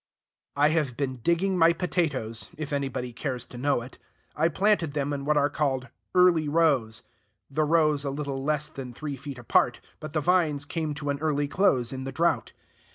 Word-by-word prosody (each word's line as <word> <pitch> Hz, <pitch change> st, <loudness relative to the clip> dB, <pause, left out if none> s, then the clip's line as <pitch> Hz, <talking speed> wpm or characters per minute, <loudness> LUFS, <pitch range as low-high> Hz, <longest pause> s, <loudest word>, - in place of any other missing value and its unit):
I 145 Hz, +1 st, +4 dB
have 150 Hz, -6 st, 0 dB
been 130 Hz, -2 st, -2 dB
digging 175 Hz, +8 st, +1 dB
my 165 Hz, 0 st, +6 dB
potatoes, 155 Hz, -10 st, -2 dB
if 155 Hz, -1 st, -5 dB
anybody 135 Hz, -3 st, -2 dB
cares 125 Hz, 0 st, -4 dB
to 125 Hz, -, -11 dB
know 135 Hz, -2 st, +1 dB
it. 125 Hz, -, -13 dB, 0.4 s
I 160 Hz, +2 st, +3 dB
planted 175 Hz, -3 st, +1 dB
them 145 Hz, 0 st, -1 dB
in 140 Hz, -1 st, -4 dB
what 150 Hz, 0 st, +2 dB
are 145 Hz, 0 st, +4 dB
called 135 Hz, -3 st, -1 dB, 0.3 s
"Early 175 Hz, -4 st, +5 dB
Rose," 140 Hz, -9 st, +2 dB, 0.5 s
the 155 Hz, +2 st, +1 dB
rows 155 Hz, -2 st, +3 dB
a 140 Hz, -, -2 dB
little 140 Hz, -1 st, -4 dB
less 150 Hz, 0 st, 0 dB
than 130 Hz, -3 st, -8 dB
three 145 Hz, 0 st, -4 dB
feet 135 Hz, 0 st, -8 dB
apart; 120 Hz, -, +2 dB, 0.2 s
but 155 Hz, -1 st, -8 dB
the 155 Hz, -, +1 dB
vines 155 Hz, -3 st, +2 dB
came 155 Hz, -1 st, -3 dB
to 145 Hz, -1 st, -2 dB
an 140 Hz, -, -3 dB
early 145 Hz, -2 st, 0 dB
close 135 Hz, -8 st, +2 dB
in 130 Hz, 0 st, -5 dB
the 135 Hz, -, -4 dB
drought. 170 Hz, +4 st, +1 dB
145 Hz, 190 wpm, -27 LUFS, 135-160 Hz, 0.5 s, my